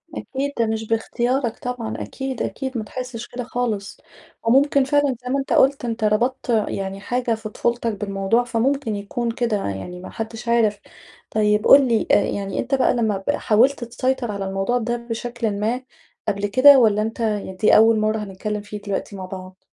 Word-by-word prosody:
أكيد 275 +2 -3
ده 230 - +4
مش 220 0 -2
باختيارك 235 +2 -1
طبعًا، 245 -3 -4
أكيد، 265 -2 -5
أكيد، 265 -2 -3
ما 220 - -2
تحسّش 250 +1 -6
كده 250 0 -6
خالص، 230 -4 -3 0.5
وممكن 275 +4 +4
فعلًا 285 -1 +2
زي 250 - -5
ما 275 +2 +1
أنت 270 - -2
قُلت 270 -1 +3
أنت 230 -1 -3
ربطت 240 +5 +1 0.2
يعني 195 0 -4
حاجة 240 +3 -1
في 220 -1 -7
طفولتك 235 +1 -1
بالموضوع 200 +3 0
فممكن 240 0 0
يكون 230 +4 -3
كده، 230 -2 0
يعني 100 - -5
ما 185 - -9
حدش 225 +1 -6
عارف، 225 -3 +2 0.5
طيب 210 0 +2
قُل 275 -1 +8
لي 230 -3 +1
يعني 200 -1 +1
أنت 265 +2 0
بقى 265 - +3
لمّا 215 -5 0
ب - - +4
حاولت 245 +5 +2
تسيطر 250 0 -1
على 200 -1 -4
الموضوع 195 +5 0
ده 240 0 -1
بشكلٍ 235 -2 -4
ما 230 +5 -1 0.5
قبل 200 -1 -1
كده، 265 +6 +7
والّا 215 -3 +4
أنت 225 +2 -3
يعني 210 -4 -2
دي 200 +3 +4
أول 225 0 +6
مَرّة 215 +1 +1
هنتكلّم 210 0 -4
فيه 210 0 -8
دلوقتي 200 0 -4
مع 190 -1 -6
بعض؟ 185 0 -9
225 Hz, 180 wpm, -22 LUFS, 210-250 Hz, 0.5 s, قُل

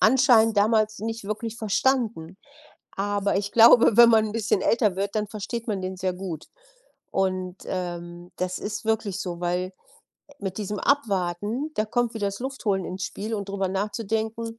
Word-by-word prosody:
anscheinend 225 -3 +5
damals 215 0 +2
nicht 225 0 -4
wirklich 215 +2 -4
verstanden. 220 -6 0 0.6
Aber 200 0 0
ich 200 +1 -2
glaube, 230 -1 +7
wenn 235 -1 +9
man 220 -1 +4
'n 210 - -5
bisschen 220 -3 0
älter 210 -5 +2
wird, 200 +2 -2
dann 215 -1 0
versteht 225 +3 -5
man 205 -4 -2
den 185 0 -4
sehr 185 0 -1
gut. 180 -4 -6 0.6
Und, 185 -1 -1
ähm, 175 -1 -5
das 185 0 -2
ist 210 +1 -5
wirklich 220 -3 -1
so, 175 -3 -5
weil, 180 +1 -1 0.6
äh, 285 - -18
mit 195 -1 -4
diesem 210 0 -3
Abwarten, 215 - 0
da 215 - +1
kommt 240 0 0
wieder 205 -3 -1
das 200 +2 -7
Luftholen 220 -8 -2
ins 185 +1 -5
Spiel 220 +3 -4
und 200 -1 -4
drüber 195 -1 -1
nachzudenken, 220 +3 -3
205 Hz, 170 wpm, -25 LUFS, 190-225 Hz, 0.6 s, wenn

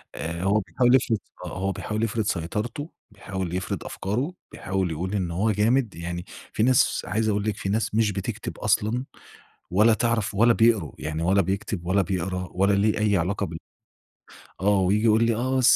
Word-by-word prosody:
آآ، 85 +2 -4
هو 100 +2 +3
بيحاول 115 +7 +3
يفرض 115 -3 +2
س - - -27
آه، - - -5
هو 95 +1 0
بيحاول 110 +3 -3
يفرض 115 0 0
سيطرته 105 - -3 0.2
بيحاول 95 -3 -5
يفرض 95 +1 -3
أفكارُه 125 - -2 0.2
بيحاول 95 -3 -2
يقول 90 +5 -3
إن 90 -4 -1
هو 100 +6 +1
جامد 110 +3 +1
يعني 85 +1 -5 0.3
فيه 110 - +1
ناس 130 0 +3
عايز 110 0 0
أقول 105 0 0
لِك 105 -1 -2
في 95 - -3
ناس 110 +1 0
مش 110 -2 +3
بتكتب 100 +3 -5
أصلًا، 110 +4 +1 0.7
ولا 105 +5 +5
تعرف 110 -3 0
ولا 115 +3 +5
بيقروا، 110 - +3
يعني 80 +1 -3
ولا 95 +3 +4
بيكتب 95 -1 -3
ولا 95 +2 +3
بيقرا 90 0 -2
ولا 100 +3 +2
ليه 105 +2 +2
أي 105 -2 +3
علاقة 100 +4 -1
بال 85 -2 -6 1.0
آه، 100 0 +3
وييجي 100 +3 +2
يقول 110 0 +5
لي، 115 -1 +2
آه 130 +3 0
100 Hz, 185 wpm, -25 LUFS, 95-110 Hz, 1.0 s, ولا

